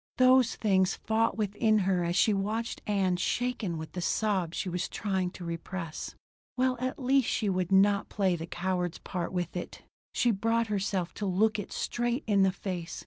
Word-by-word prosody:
Those 255 -1 +5
things 190 -3 +2
fought 225 +1 0
within 215 +1 +2
her 185 -3 +1
as 170 0 -1
she 210 +3 +4
watched 215 +4 -2
Ann 190 -3 +1
shaken 230 -4 -1
with 160 0 -7
the 180 - -5
sobs 185 -3 0
she - - -2
was 180 +1 -2
trying 190 -3 -1
to 180 -1 -9
repress. 170 0 -5 0.4
Well 255 0 +2
at 255 +1 -2
least 265 -1 +2
she 210 - 0
would 185 -1 -1
not 200 +1 +4
play 190 -3 +1
the 165 0 -6
coward's 180 -1 -2
part 175 -3 -4
with 175 -2 -3
it! 180 - -6 0.3
She 245 - +3
brought 230 +2 0
herself 195 -3 -1
to 205 - -3
look 210 +3 +2
it 205 - -6
straight 240 +2 -1
in 205 -3 +3
the 190 -1 +4
face. 185 -3 -5
195 Hz, 185 wpm, -29 LUFS, 180-220 Hz, 0.4 s, Those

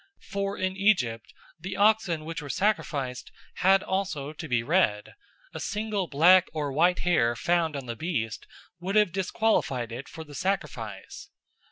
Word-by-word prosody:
For 200 0 -2
in 185 0 -1
Egypt 180 - +1 0.3
the 190 +3 -6
oxen 200 -7 +2
which 165 0 -5
were 145 - -8
sacrificed 140 -8 -1 0.3
had 195 +1 +4
also 185 -7 -2
to 160 - -7
be 120 -3 +1
red; 120 - +1 0.4
a - - -6
single 210 -3 -2
black 175 +6 +6
or 145 -3 -2
white 175 +5 +3
hair 120 -10 +2
found 165 +4 +1
on 140 -2 -5
the 120 -1 -5
beast 115 -7 -3 0.3
would 190 +3 -3
have 210 -4 +4
disqualified 185 - 0
it 125 +4 -7
for 160 - -8
the 150 -2 -14
sacrifice. 130 - -4
165 Hz, 155 wpm, -27 LUFS, 135-190 Hz, 0.4 s, black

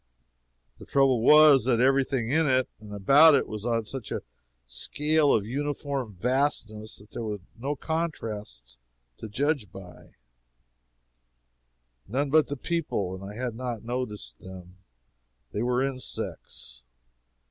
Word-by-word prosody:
The - - -11
trouble 135 -4 +3
was 150 -1 +7
that 120 -3 +3
every 135 +2 +4
thing 125 -3 -2
in 160 +1 +3
it 130 -1 +2
and 105 -1 -12
about 140 +10 +6
it 135 - +1
was 110 +1 -5
on 115 -2 0
such 125 +1 -7
a - - -3 0.4
scale 150 - +1
of 100 - +2
uniform 140 -2 -3
vastness 110 -1 -1
that 105 +1 -15
there - - -5
were 105 -2 -3 0.2
no 135 +5 -3
contrasts 105 - -4 0.4
to 110 - -7
judge 135 - -1
by 90 -4 -13 1.9
none 135 +6 -1
but 155 0 +5
the 145 - -4
people, 135 - -2
and 95 +1 -8
I 100 +1 -8
had 125 0 -3
not 120 -2 -5
noticed 110 - -5
them. 90 -1 -12 0.7
They 105 - -3
were 125 +2 +1
insects. 125 - -5
125 Hz, 135 wpm, -27 LUFS, 105-140 Hz, 1.9 s, was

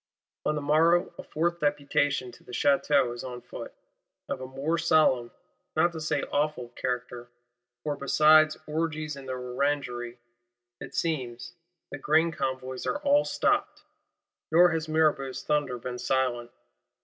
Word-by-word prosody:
On 150 - +1
the 150 - -3
morrow 165 +4 +3
a - - -5
fourth 170 +2 -1
Deputation 145 -3 0
to - - -17
the - - -13
Château 140 0 +2
is 120 - -7
on 125 -2 -6
foot: - - -9 0.6
of 130 - -4
a 130 - -5
more 140 +6 -2
solemn, 155 -7 +3 0.5
not 170 +2 +3
to 160 -1 -7
say 155 - -1
awful 145 -4 -1
character, 125 -1 -4 0.5
for, 150 -1 -1
besides 155 +2 +5
"orgies 155 -1 -2
in 135 -1 -10
the 130 - -3
Orangery," 125 -1 -2 0.6
it - - -9
seems, 130 -8 -3 0.4
"the 145 - -6
grain 160 +4 +3
convoys 130 -3 -4
are - - 0
all 290 +1 +4
stopped;" - - 0 0.7
nor 175 +2 +6
has 160 -1 -2
Mirabeau's 155 -4 +1
thunder 145 -4 0
been 125 +1 -6
silent. 125 -1 0
145 Hz, 145 wpm, -28 LUFS, 125-155 Hz, 0.7 s, nor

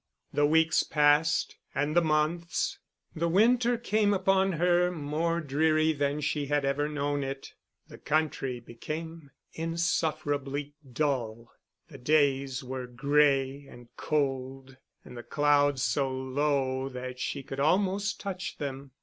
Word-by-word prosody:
The 145 0 +3
weeks 160 +1 +3
passed 150 +1 +2 0.2
and 145 +3 0
the 175 - +6
months; 160 +2 0 0.4
the 170 +2 0
winter 235 +6 +3
came 210 -3 +1
upon 190 0 +2
her, 175 +1 +3
more 165 +1 -1
dreary 155 +2 +2
than 145 0 -1
she 145 -1 -1
had 145 0 +1
ever 145 +2 0
known 145 -1 -1
it; 135 0 -6 0.3
the - - -13
country 145 -5 -1
became 155 +6 -7 0.2
insufferably 150 -4 -2 0.2
dull. 120 -5 -2 0.4
The 140 -5 -11
days 135 -1 +1
were 130 0 -5
gray 140 +1 +1
and 120 -2 -15
cold, 135 -2 -2 0.3
and - - -11
the 120 - -6
clouds 145 -1 +2
so 140 -2 +1
low 130 0 -1
that 125 0 -7
she 140 +1 -3
could 135 +1 -7
almost 195 +6 +1
touch 190 -2 -5
them. 135 -2 -6
145 Hz, 130 wpm, -28 LUFS, 135-160 Hz, 0.4 s, the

